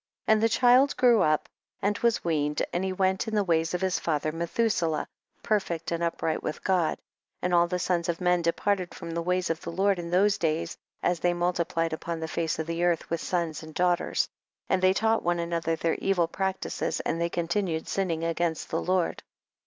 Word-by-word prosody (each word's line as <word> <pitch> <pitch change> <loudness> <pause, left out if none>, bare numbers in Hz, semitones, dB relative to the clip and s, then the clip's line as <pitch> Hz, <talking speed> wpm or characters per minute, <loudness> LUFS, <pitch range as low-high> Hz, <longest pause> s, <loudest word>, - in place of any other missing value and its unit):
15. - - +5
And 215 - +2
the 225 - +4
child 250 +4 +4
grew 240 -3 +5
up 155 0 +2 0.3
and 205 +1 +1
was 235 -2 +1
weaned, 150 -3 0
and 175 - 0
he 190 - -1
went 190 +3 0
in 220 - -2
the 205 - +3
ways 165 -1 +1
of 180 - -2
his 190 -1 +1
father 155 -1 -1
Methuselah, 170 0 0 0.4
per 215 -1 +3
fect 170 -4 -5
and 170 0 -1
upright 165 -1 -1
with 155 - -5
God. 180 -4 +2
16. - - -37 0.4
And 180 0 0
all 170 0 +5
the 180 +1 -1
sons 175 -1 0
of 165 - -1
men 180 -1 +2
depar 170 +4 +1
ted 180 -2 -7
from 170 - -7
the 170 +1 -2
ways 180 0 0
of 165 +1 -3
the - - -5
Lord 195 +2 +2
in 170 -1 -5
those 195 +3 +3
days 165 +1 -1 0.3
as 175 -1 +1
they 175 +1 +1
multiplied 170 -2 0
upon 165 +1 -4
the 160 - -3
face 165 0 -1
of 160 - -2
the 165 +1 -3
eartii 175 -2 +1
with 170 - -1
sons 170 -4 -2
and 155 -1 -11
daughters, 180 -1 +1 0.4
and 185 - +2
they 185 0 +5
taught 225 +2 +2
one 175 0 +1
another 170 -1 -1
their 165 0 0
evil 180 -4 +1
practices, 190 +2 -2
and 165 - -2
they 170 - +1
continued 170 -1 -1
sinning 170 -4 -1
against 165 -1 -1
the 165 - 0
Lord. 185 -1 0
175 Hz, 215 wpm, -27 LUFS, 165-190 Hz, 0.4 s, 15